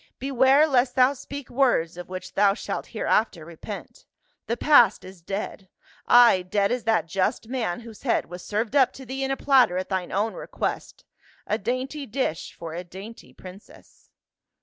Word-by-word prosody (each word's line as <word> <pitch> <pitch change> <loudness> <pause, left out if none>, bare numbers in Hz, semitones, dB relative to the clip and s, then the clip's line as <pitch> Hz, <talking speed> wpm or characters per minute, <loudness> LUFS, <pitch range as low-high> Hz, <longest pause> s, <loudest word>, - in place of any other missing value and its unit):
" - - -61
Beware 270 +2 +4
lest 255 -4 +1
thou 255 +1 +5
speak 280 0 -8
words 240 -11 +1
of 180 0 -9
which 185 0 -7
thou 200 0 +3
shalt - - -5
hereafter 195 -7 0
repent. 200 - -10 0.4
The 235 - -1
past 295 +3 +5
is 185 -1 -12
dead 195 +1 -6 0.2
— - - -29
Ay, 240 -6 +7
dead 200 +2 0
as 245 -2 -2
that 225 -4 +2
just 185 +5 -1
man 235 -7 -3
whose 225 -2 -12
head 240 - 0
was 180 0 -10
served 220 +5 -2
up 260 -3 +4
to 265 - -11
thee 265 +2 -4
in 270 - -1
a 270 - -1
platter 255 -10 +4
at 185 - -3
thine 185 -2 -2
own 210 +3 0
request, - - -5 0.4
a 215 - -1
dainty 260 +6 -3
dish 210 - -3
for 165 -1 -8
a 175 +2 -5
dainty 195 +6 -11
princess." 185 +2 -15
225 Hz, 180 wpm, -25 LUFS, 185-260 Hz, 0.4 s, Ay